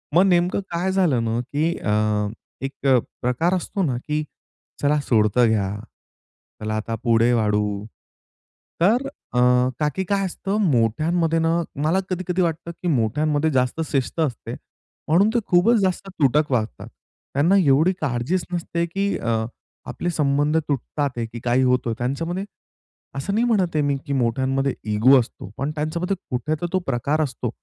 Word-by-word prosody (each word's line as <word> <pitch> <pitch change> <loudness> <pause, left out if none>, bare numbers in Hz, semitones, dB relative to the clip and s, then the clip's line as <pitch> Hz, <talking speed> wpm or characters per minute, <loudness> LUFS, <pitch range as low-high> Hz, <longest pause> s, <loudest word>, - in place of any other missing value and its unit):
मग 180 - +7
नेमकं 180 0 +2
काय 175 +3 0
झालं 165 -12 +2
ना, 115 +1 0
की 155 +6 -1
अ, 105 0 +1 0.3
एक 135 +1 -4 0.3
प्रकार 125 +9 +1
असतो 190 +2 -1
ना, 135 -7 0
की 150 0 0 0.6
चला 150 +1 +2
सोडतं 115 -1 +3
घ्या. 100 -3 0 0.9
चला 110 0 -2
आता 110 +1 -3
पुढे 115 0 +3
वाढू. 105 -2 0 1.0
तर 235 +10 +3
अ, 275 - -5 0.4
का, 150 -1 +2
की 190 - -1
काय 195 +1 0
असतं 195 +2 -3
मोठ्यांमध्ये 160 +8 +1
ना 165 +1 +2 0.2
मला 165 +5 +2
कधी-कधी 185 0 -1
वाटतं, 170 -1 -1
की 175 +1 -7
मोठ्यांमध्ये 145 +3 +1
जास्त 130 +4 0
शिस्त 135 +3 -1
असते, 140 -8 -2 0.5
म्हणून 180 +7 +4
ते - - +5
खूपच 190 +7 +4
जास्त 190 0 -1
तुटक 150 -4 +1
वागतात. 115 -3 -2 0.5
त्यांना 155 +8 +3
एवढी 160 0 +4
काळजीच 140 +6 -1
नसते, 170 0 -1
की 195 +4 -1
अ, 115 -1 -1 0.4
आपले 175 - -3
संबंध 145 -1 +1
तुटतात 145 -1 -1
आहे, 115 - -1
की 115 +1 -8
काही 125 +2 +2
होत 125 0 +3
आहे 115 - -1
त्यांच्यामध्ये. 165 +10 -2 0.7
असं 140 +9 -3
नाही 230 +3 +2
म्हणत 190 -8 +1
आहे 150 - +3
मी, 140 -1 +1
की 140 - -3
मोठ्यांमध्ये 135 +2 0 0.2
इगो 130 +6 +6
असतो. 115 -5 -6
पण 140 +2 -2
त्यांच्यामध्ये 170 +5 -1 0.2
कुठे 140 +5 -1
तर - - -1
तो 185 - +3
प्रकार 135 +4 0
असतो. 125 -4 -2
150 Hz, 155 wpm, -22 LUFS, 120-175 Hz, 1.0 s, मग